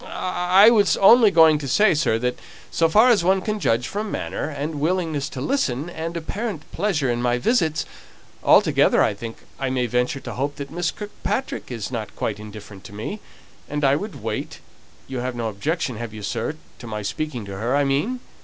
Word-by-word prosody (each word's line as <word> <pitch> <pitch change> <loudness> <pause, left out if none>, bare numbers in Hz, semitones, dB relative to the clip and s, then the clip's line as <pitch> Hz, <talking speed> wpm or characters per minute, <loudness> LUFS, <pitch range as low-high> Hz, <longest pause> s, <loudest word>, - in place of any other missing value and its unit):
"I 185 +4 +4
was 210 -4 +3
only 225 +2 +7
going 160 -4 +6
to 140 - -5
say, 205 +10 +4
sir, 150 -7 +1
that 125 +2 -2 0.3
so 165 -1 +2
far 220 +9 +6
as 210 -8 +4
one 190 +2 +3
can 215 +2 -2
judge 120 - +1
from 210 +6 -4
manner, 155 - -3
and 150 +1 -4
willingness 160 -3 0
to - - -7
listen, 170 - -1
and 165 0 -4
apparent 195 +1 -4
pleasure 155 -11 0
in 120 0 -1
my 120 0 +1
visits 160 - +1 0.6
altogether, - - +5
I - - +1
think 115 +3 -8 0.2
I 135 -1 -1
may 130 -1 0
venture 125 +3 0
to - - -6
hope 140 +3 -2
that 140 -1 -7
Miss 175 0 -1
Kirkpatrick 210 +5 -4
is 115 -3 -5
not 110 -4 -5
quite 105 -2 -3
indifferent 105 -2 -10
to 100 - -11
me, 110 - -5 0.5
and 150 0 -3
I 135 +1 +4
would 205 +7 -6
wait, - - -4 0.5
you 130 -2 -4
have 125 0 -3
no 115 -2 -2
objection, 130 - -2
have 115 -1 -6
you, 105 - -8
sir, 150 +8 -2 0.2
to 120 - -9
my 105 -1 -4
speaking 130 0 -4
to 100 -1 -7
her, 120 +6 0
I 145 - +3
mean?" 150 - 0
145 Hz, 200 wpm, -22 LUFS, 120-180 Hz, 0.6 s, only